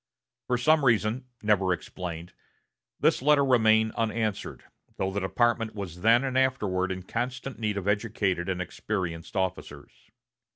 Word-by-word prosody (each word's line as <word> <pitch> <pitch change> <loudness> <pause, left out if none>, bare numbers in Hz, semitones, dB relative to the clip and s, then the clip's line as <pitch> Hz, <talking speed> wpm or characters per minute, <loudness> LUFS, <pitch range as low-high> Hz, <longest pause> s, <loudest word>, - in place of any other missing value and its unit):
For 125 - +1
some 155 +4 +3
reason, 120 0 +2 0.2
never 100 -3 +2
explained, 90 -1 -5 0.7
this - - +2
letter 145 0 +4
remained 110 -3 +4
unanswered, 110 -2 -2 0.3
though 95 0 -1
the 100 - -2
department 110 +3 0
was 90 -4 -7
then 115 +5 +5
and 130 -1 -2
afterward 105 -9 +1
in 95 -1 -5
constant 125 +5 -4
need 105 -2 -1
of 100 -1 -4
educated 100 -3 0
and 90 -1 -1
experienced 90 -1 -4
officers. 90 -6 -3
105 Hz, 135 wpm, -27 LUFS, 95-120 Hz, 0.7 s, then